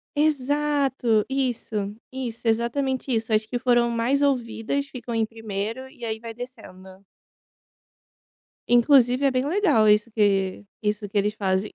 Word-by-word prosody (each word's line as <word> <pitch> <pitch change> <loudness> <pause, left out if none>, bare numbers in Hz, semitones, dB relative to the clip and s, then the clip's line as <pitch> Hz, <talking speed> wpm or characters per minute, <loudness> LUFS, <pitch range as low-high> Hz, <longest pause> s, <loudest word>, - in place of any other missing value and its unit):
Exato, 285 -5 +1
isso, 255 -4 -2 0.4
isso, 245 -3 -5
exatamente 260 +4 0
isso, 225 0 -1
as 215 0 +2
que 245 +2 -3
foram 240 -1 +3
mais 240 +5 +1
ouvidas 265 0 -1
ficam 245 -3 -7
em 225 -1 +1
primeiro 225 +3 -5
e 245 - -15
aí 220 0 -3
vai 230 0 -8
descendo. 200 -6 -11 1.6
Inclusive 245 +1 +4
é 275 - +4
bem 255 +1 0
legal 300 - +3
isso 210 +2 +4
que 200 -2 +1 0.2
isso 210 0 -1
que 205 - -3
eles 210 +1 +1
fazem. 190 0 -1
235 Hz, 140 wpm, -24 LUFS, 215-265 Hz, 1.6 s, Inclusive